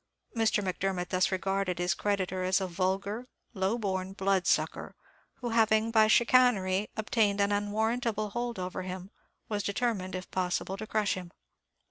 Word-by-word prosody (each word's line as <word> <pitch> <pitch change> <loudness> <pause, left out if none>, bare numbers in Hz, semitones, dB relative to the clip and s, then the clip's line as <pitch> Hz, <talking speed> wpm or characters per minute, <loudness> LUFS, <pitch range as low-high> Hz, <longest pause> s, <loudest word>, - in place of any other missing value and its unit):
Mr. 220 -2 +2
Macdermot 185 -1 -2
thus 185 +1 +2
regarded 195 -1 -1
his 175 0 +1
creditor 190 -1 -1
as 185 +1 +2
a 190 - -1
vulgar, 195 +6 -2 0.3
low 195 +2 0
born 190 -3 -2
blood 195 -1 +1
sucker, - - 0 0.4
who, 245 - -5
having 225 0 +3
by 220 -1 +5
chicanery 215 -5 +4
obtained 215 -2 +1
an 200 0 +2
unwarrantable 215 +1 0
hold 240 0 -3
over 185 0 -4
him, 185 +1 -6 0.4
was 210 -1 -1
determined, 200 -3 -1
if 185 0 -7
possible, 185 +1 -1
to 215 +2 -7
crush 215 -2 +1
him. 180 -2 -7
200 Hz, 150 wpm, -30 LUFS, 185-220 Hz, 0.4 s, by